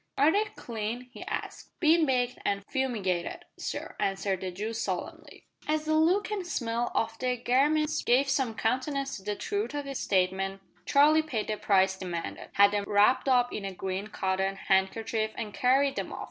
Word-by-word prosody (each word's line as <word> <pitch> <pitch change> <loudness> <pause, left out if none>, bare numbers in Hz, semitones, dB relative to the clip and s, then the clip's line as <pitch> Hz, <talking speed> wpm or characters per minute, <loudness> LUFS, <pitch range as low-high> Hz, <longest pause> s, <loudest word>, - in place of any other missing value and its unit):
"Are 290 +3 +5
they 415 +4 +2
clean?" 235 +2 -5
he - - -10
asked. - - -6
"Bin 325 -1 +4
baked 250 -1 0
and 200 0 -1
fumigated, 210 -11 -2
sir," - - -5
answered 195 -1 -1
the 185 - -3
Jew 210 +5 -4
solemnly. 225 - -5 0.2
As 310 0 0
the 310 - +1
look 360 +8 +3
and 390 -4 -3
smell 235 -6 -1
of 225 0 -1
the 250 -1 0
garments 295 +5 +2
gave 260 +3 +3
some 265 -4 0
countenance 270 +4 -1
to 195 - -13
the 205 +1 -2
truth 405 - -3
of 290 -1 -3
this 275 -1 -4
statement, 195 +1 0 0.2
Charlie 300 +2 +5
paid 245 -10 -3
the 215 - 0
price 190 -2 +3
demanded, 180 -3 -5
had 200 0 +6
them 205 -1 -1
wrapped 210 +7 +4
up 245 -1 +3
in 210 - -4
a 195 - -3
green 190 +2 -3
cotton 190 -1 -1
handkerchief, 215 +3 0
and 215 -3 -5
carried 270 +4 +3
them - - -3
off. - - -6
235 Hz, 180 wpm, -29 LUFS, 195-280 Hz, 0.2 s, had